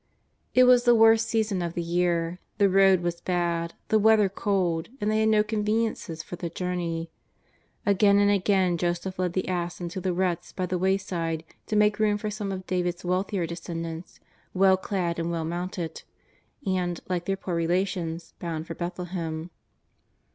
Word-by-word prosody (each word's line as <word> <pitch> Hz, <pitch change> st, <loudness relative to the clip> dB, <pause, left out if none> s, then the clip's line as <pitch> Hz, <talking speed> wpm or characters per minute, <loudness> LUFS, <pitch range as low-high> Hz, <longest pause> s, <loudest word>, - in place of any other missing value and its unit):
It 255 Hz, -, +7 dB
was 250 Hz, -1 st, +6 dB
the 240 Hz, -1 st, +6 dB
worst 225 Hz, 0 st, +5 dB
season 220 Hz, -4 st, 0 dB
of 170 Hz, -1 st, -3 dB
the 175 Hz, -, -1 dB
year, 170 Hz, 0 st, 0 dB, 0.2 s
the 200 Hz, -, +5 dB
road 190 Hz, -1 st, +5 dB
was 170 Hz, 0 st, -3 dB
bad, 170 Hz, -2 st, -1 dB
the 220 Hz, -, +4 dB
weather 215 Hz, -2 st, +5 dB
cold, 185 Hz, -4 st, -1 dB
and 210 Hz, 0 st, 0 dB
they 215 Hz, -, +2 dB
had 220 Hz, 0 st, +3 dB
no 215 Hz, -1 st, +4 dB
conveniences 215 Hz, -6 st, -1 dB
for 180 Hz, -, -7 dB
the 170 Hz, -, -4 dB
journey. 170 Hz, -2 st, -3 dB, 0.7 s
Again 200 Hz, 0 st, +4 dB
and 205 Hz, 0 st, +4 dB
again 190 Hz, -3 st, +2 dB
Joseph 175 Hz, +2 st, -2 dB
led 180 Hz, -2 st, 0 dB
the 185 Hz, -, -1 dB
ass 175 Hz, -1 st, -2 dB
into 175 Hz, +1 st, -5 dB
the 185 Hz, 0 st, 0 dB
ruts 175 Hz, -1 st, -1 dB
by 185 Hz, -, -2 dB
the 180 Hz, 0 st, -2 dB
wayside 175 Hz, -4 st, -1 dB, 0.2 s
to 215 Hz, -, -1 dB
make 210 Hz, 0 st, +3 dB
room 210 Hz, -1 st, +3 dB
for 210 Hz, 0 st, -4 dB
some 205 Hz, -1 st, -4 dB
of 185 Hz, -1 st, -5 dB
David's 180 Hz, -1 st, -2 dB
wealthier 185 Hz, 0 st, 0 dB
descendants, 165 Hz, 0 st, -6 dB, 0.4 s
well 190 Hz, 0 st, +5 dB
clad 180 Hz, -3 st, -2 dB
and 165 Hz, 0 st, -1 dB
well 165 Hz, -1 st, -2 dB
mounted, 175 Hz, -1 st, -4 dB, 0.6 s
and, 180 Hz, -3 st, -1 dB
like 180 Hz, -2 st, -2 dB
their 195 Hz, 0 st, -1 dB
poor 185 Hz, -2 st, -5 dB
relations, 170 Hz, -1 st, -1 dB
bound 165 Hz, -2 st, -4 dB
for 165 Hz, -, -6 dB
Bethlehem. 175 Hz, -2 st, -4 dB
180 Hz, 170 wpm, -26 LUFS, 170-200 Hz, 0.7 s, It